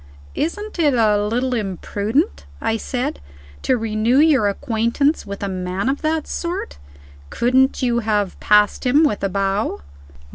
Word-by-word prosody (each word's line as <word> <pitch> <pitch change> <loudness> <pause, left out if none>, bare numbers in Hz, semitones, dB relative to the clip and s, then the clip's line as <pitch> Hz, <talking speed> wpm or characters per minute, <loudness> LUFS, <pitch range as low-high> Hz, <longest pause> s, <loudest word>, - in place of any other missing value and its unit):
"Isn't 410 +5 -3
it 295 -5 +3
a 210 -3 +3
little 245 +5 -1
imprudent," 215 - -2
I 225 0 0
said, 245 - -3 0.4
"to 260 - +1
renew 225 +2 +1
your 290 -8 +4
acquaintance 235 +5 0
with 200 0 -6
a - - -1
man 185 +4 -2
of 275 - -2
that 315 0 0
sort? 340 - -4 0.5
Couldn't 260 +3 +2
you 240 -1 +2
have 210 -4 -1
passed 210 0 +3
him, 280 +5 +4
with 285 -11 0
a 195 - +1
bow?" 195 - -1
230 Hz, 145 wpm, -20 LUFS, 205-280 Hz, 0.5 s, your